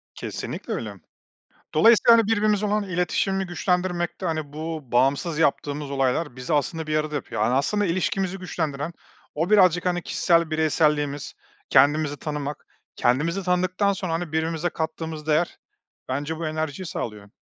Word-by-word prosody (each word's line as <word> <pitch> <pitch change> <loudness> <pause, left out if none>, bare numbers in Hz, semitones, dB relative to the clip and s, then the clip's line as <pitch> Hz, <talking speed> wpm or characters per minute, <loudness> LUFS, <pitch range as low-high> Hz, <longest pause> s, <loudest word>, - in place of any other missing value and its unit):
Kesinlikle - - -5
öyle. 110 -3 -4 0.8
Dolayısıyla, 230 +6 +6
hani, 225 -3 +2
birbirinize 210 -1 +2
olan 210 0 +1
iletişimi 190 +1 0
güçlendirmekte, 180 0 -1
hani, 155 -4 -3
bu 160 +1 -4
bağımsız 140 +6 +2
yaptığımız 145 -2 0
olaylar 135 +1 0
bizi 125 +4 -3
aslında 155 +2 -1
bir 155 - 0
arada 155 0 -2
yapıyor. 135 -6 -3
Hani, 110 +3 +2
aslında 205 +10 +1
ilişkimizi 185 +2 -1
güçlendiren, 160 -3 -3 0.4
o 165 +5 0
birazcık, 185 -4 +5
hani, 175 -1 +1
kişisel 170 -1 +2
bireyselliğimiz, 150 -2 +1 0.4
kendimizi 145 +2 +4
tanımak, 150 -1 -5 0.3
kendimizi 165 +10 +1
tanıdıktan 185 +2 +1
sonra, 185 -3 -3
hani, 170 +1 -2
birbirimize 160 +2 -1
kattığımız 160 -1 -5
değer 160 +3 +1 0.5
bence 145 +4 -2
bu 165 -1 -3
enerjiyi 155 +3 -3
sağlıyor. 105 -9 -5
160 Hz, 140 wpm, -24 LUFS, 145-180 Hz, 0.8 s, Dolayısıyla